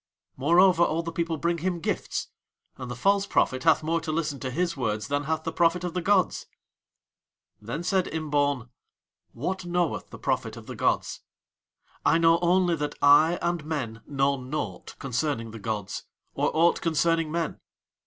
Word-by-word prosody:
'" - - -67
Moreover, 170 +5 +4
all 165 -1 +2
the 165 - -4
people 165 -1 -2
bring 170 +2 0
him 175 +1 -1
gifts, - - -3 0.5
and 125 -1 -7
the 125 - -4
false 200 - +2
prophet 130 -5 +1
hath 160 -2 +4
more 165 +1 0
to 160 -1 -3
listen 155 -3 -2
to 130 - -4
his 170 +5 -1
words 110 -3 -2
than 145 0 -1
hath 160 +1 -1
the 165 - -2
Prophet 170 +1 +2
of 175 -2 -3
the 180 - -1
gods. 195 0 +1 1.1
Then 120 +10 -5
said 185 +1 +1
Imbaun: 145 -5 -1 0.6
"What 185 +10 -3
knoweth 175 -2 -1
the - - -10
Prophet - - -2
of - - -10
the - - -7
gods? - - 0 0.8
I - - +4
know 165 0 +4
only 175 0 +3
that 150 0 -3
I 155 +4 +6
and 175 -2 -1
men 130 -8 -4
know 140 0 +1
naught 125 -8 -5
concerning 125 -3 -2
the 115 - -9
gods 105 -2 -4 0.3
or - - +1
aught 170 +2 +3
concerning 165 0 +1
men. 165 -1 -2
160 Hz, 175 wpm, -26 LUFS, 140-170 Hz, 1.1 s, I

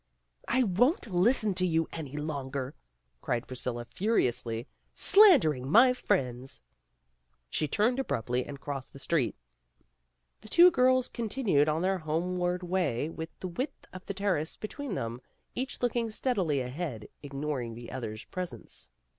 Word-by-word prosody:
"I 260 +1 +3
won't 235 - +2
listen 210 +3 +4
to 185 0 +2
you 165 -1 +1
any 150 -3 -6
longer," 140 -3 -4 0.5
cried 120 0 -1
Priscilla 120 -2 -4
furiously, 120 - 0 0.3
"slandering 255 - +6
my 245 - +7
friends." 125 - -2 0.9
She 155 - +1
turned 235 - +2
abruptly 125 - -1
and 140 +1 -8
crossed 135 -2 -6
the - - -10
street. 135 -4 0 1.0
The 215 - -12
two 350 +6 +8
girls 255 -2 +3
continued 215 - +1
on 160 +3 0
their 190 0 +1
homeward 180 +3 -1
way 170 -7 0
with 160 0 -6
the 185 - -3
width 250 - -5
of 185 0 -9
the 200 - -4
Terrace 185 -6 0
between 235 +1 -5
them, 115 -1 -4 0.3
each 260 0 -4
looking 240 -1 +1
steadily 190 - 0
ahead, 125 -4 -5
ignoring 140 -4 -4
the 120 0 -9
other's 110 -4 -5
presence. 175 -11 -6
165 Hz, 140 wpm, -29 LUFS, 130-215 Hz, 1.0 s, two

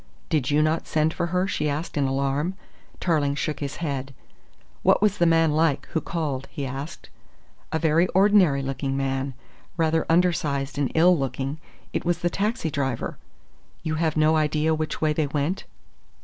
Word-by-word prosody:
"Did 155 -6 +1
you 150 +1 +3
not 155 +1 0
send 155 0 +1
for 170 - -1
her?" 180 +2 0
she 150 -6 -1
asked 150 +4 -3
in 140 -2 +1
alarm. 140 +6 0 0.4
Tarling 150 -5 +1
shook 150 +1 -2
his 140 -2 -4
head. 140 -4 -4 0.7
"What - - +4
was 205 -1 +2
the 170 - +4
man 165 -1 +4
like 155 -2 +1
who 160 - -1
called?" 145 -6 -3
he 140 - -5
asked: 135 +5 -7 0.6
"A 160 - +1
very 160 +2 +3
ordinary 190 -8 +4
looking 135 0 -2
man, 135 -1 -2 0.4
rather 160 -1 +1
under 175 +2 +4
sized 140 -3 -2
and 140 - 0
ill 175 +3 +6
looking 135 0 -3 0.3
it - - -1
was 175 0 +1
the 175 0 -1
taxi 205 -5 -1
driver." 135 -4 -2 0.6
"You 160 - -1
have 160 -1 0
no 155 +1 +4
idea 155 +1 +1
which 155 0 -3
way 155 -1 +2
they 150 -1 0
went?" 145 +6 -2
155 Hz, 175 wpm, -25 LUFS, 140-165 Hz, 0.7 s, ill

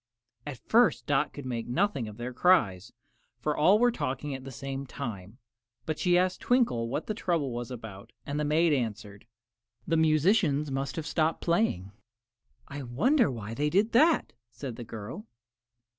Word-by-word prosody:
At 140 -4 -5
first 235 - +3
Dot 145 -2 +1
could 145 - -9
make 120 -3 -4
nothing 140 - 0
of 105 0 -9
their 120 +1 -5
cries, 120 - +2 0.5
for 150 +4 -1
all 185 +7 +5
were 245 +2 +4
talking 140 - -3
at 130 -1 -6
the 135 - -8
same 135 +2 -6
time; 110 -6 -7 0.5
but 155 -1 -3
she 175 -1 +3
asked 185 0 +1
Twinkle 230 - +1
what 140 - -3
the 215 - -2
trouble 170 - -1
was 120 0 -5
about 110 -3 -9
and 145 +1 -3
the - - 0
maid 155 +2 +3
answered, 110 -5 -4 0.6
"The 165 - +1
musicians 155 -2 +2
must 135 +1 -3
have 160 - -4
stopped 155 +1 0
playing." 170 - 0 0.8
"I 140 0 -7
wonder 225 - +2
why 115 -4 -6
they 150 +5 0
did 205 +7 +2
that," 310 - +3 0.2
said 120 +1 -7
the 120 - -7
girl. 115 - -8
140 Hz, 170 wpm, -28 LUFS, 120-170 Hz, 0.8 s, all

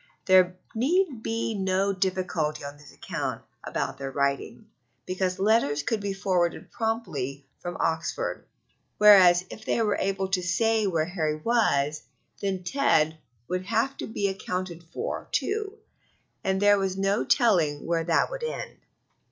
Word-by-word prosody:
There 185 -1 +5 0.2
need 285 - +1
be 225 0 -2
no 195 0 +1
difficulty 180 -5 -1
on 140 +1 -7
this 145 0 -15
account - - -4 0.2
about - - -3
their 135 0 -4
writing, 140 - -2 0.4
because 185 0 -1
letters 190 -8 +2
could 220 +8 -1
be 200 -1 -3
forwarded 185 -3 -1
promptly 160 - -3
from 175 0 -5
Oxford, 165 - -2 0.5
whereas 185 -4 +7
if 220 - -9
they - - 0
were 210 -2 +1
able 195 0 -1
to 190 -1 +1
say 220 +4 +1
where 165 -4 +1
Harry 160 -3 -1
was, 155 -7 +1 0.4
then 190 -2 -2
Ted 160 - +2 0.3
would 180 +1 -3
have 270 +5 +1
to - - -5
be 205 -2 -1
accounted 185 -3 -4
for, - - -4
too, 420 0 -1 0.7
and 190 0 +1
there 205 0 +5
was 190 -1 -1
no 195 +2 +1
telling 175 - +2
where 165 -1 0
that 165 - +2
would - - -5
end. 470 - -5
190 Hz, 145 wpm, -26 LUFS, 165-215 Hz, 0.7 s, whereas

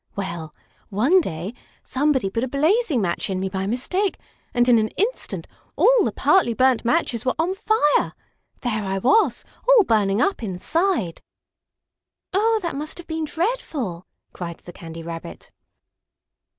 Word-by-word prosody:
"Well, 170 -5 -5 0.3
one 255 - +4
day, 175 - -5 0.3
somebody 265 -7 +1
put 230 +4 -1
a - - 0
blazing 305 - +2
match 170 +1 -1
in 190 -1 -1
me 190 0 -2
by 190 0 -3
mistake, 365 - 0 0.3
and, 240 0 +2
in 240 -2 +6
an 215 - +1
instant, 445 +6 -2 0.3
all - - +5
the - - 0
partly 365 -12 +3
burnt 260 -1 +3
matches 240 -3 0
were 255 - 0
on 335 +4 +1
fire. 390 -6 +2 0.5
There 215 -4 -1
I 195 0 -2
was, 265 - +3 0.2
all - - +8
burning 210 - +2
up 395 -1 +1
inside." 225 - -1 1.1
"Oh, 445 +4 +3
that 340 - -2
must 300 +2 -5
have 350 - -9
been 320 -1 -3
dreadful!" 300 - -3 0.3
cried 170 -2 -6
the 175 - -11
Candy 165 0 -9
Rabbit. 165 0 -8
250 Hz, 150 wpm, -23 LUFS, -, 1.1 s, all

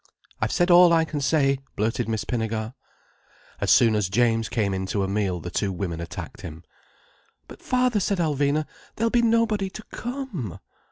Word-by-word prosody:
"I've - - 0
said 175 -1 +2
all 175 0 +8
I 165 -1 +4
can 150 -2 -4
say," 135 -1 +2 0.2
blurted 115 +2 -1
Miss 110 -2 -1
Pinnegar. 110 -1 -2 0.9
As - - -1
soon 115 -2 +5
as 105 -3 0
James 115 +1 +1
came 100 -4 0
in 95 0 -3
to 100 0 -1
a - - -1
meal, 95 -3 -1
the 90 +2 -7
two 100 +2 -1
women 85 -3 -4
attacked 85 - -7
him. 80 +2 -9 0.8
"But - - -13
father," 250 -3 +1
said 200 +1 0
Alvina, 150 -2 +1 0.3
"there'll 230 +1 0
be 240 - +3
nobody 225 -4 +2
to 215 - -9
come." 235 - -5
125 Hz, 175 wpm, -24 LUFS, -, 0.9 s, all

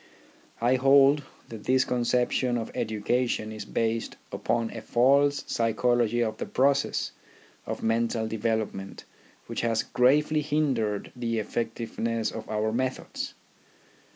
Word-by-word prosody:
I 120 +3 +3
hold 140 +2 +5 0.2
that 110 -2 -9
this 130 +1 +3
conception 125 0 +1
of 115 -1 -4
education 110 +1 -1
is 110 -2 -7
based 115 +1 -1 0.2
upon 115 -1 -1
a - - -7
false 140 +4 +3
psychology 120 0 +1
of 110 -1 -3
the - - -4
process 140 +1 +1 0.6
of - - -4
mental 115 0 +1
development 110 -3 -3 0.4
which - - -4
has 115 -1 +1
gravely 150 +5 +3
hindered 135 -9 0
the 115 -2 -2
effectiveness 115 0 -2
of - - -8
our 110 0 0
methods. 130 +3 -3
120 Hz, 120 wpm, -27 LUFS, 110-130 Hz, 0.6 s, hold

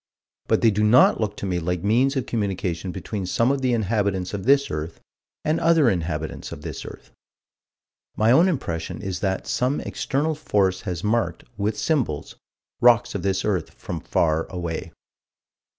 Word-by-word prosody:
But - - +2
they 115 - +5
do 105 +1 0
not 115 +2 +5
look 105 -1 -2
to - - -4
me 90 -2 -1
like 90 0 -2
means 125 +7 +2
of 130 -2 -1
communication 95 -6 -2
between 95 +1 -5
some 115 +7 +2
of 140 -1 -1
the 130 -1 +1
inhabitants 100 -4 0
of 100 -1 -4
this 140 +2 +4
earth 75 +2 -4 0.5
and 155 +2 +1
other 165 -7 +4
inhabitants 80 -3 -3
of - - -8
this - - -6
earth. - - -11 1.1
My 110 +2 +4
own 165 +9 +6
impression 85 - -3
is 95 -3 -3
that 95 -1 -1
some 130 +3 0
external 145 +3 -1
force 100 -11 0
has 90 -1 -4
marked, 115 +3 0
with 105 +1 -1
symbols, 110 - -1 0.5
rocks 120 0 +5
of 100 - -3
this 95 0 0
earth, 95 -6 -1
from - - -5
far 80 0 0
away. 85 -1 -4
105 Hz, 165 wpm, -23 LUFS, 90-120 Hz, 1.1 s, own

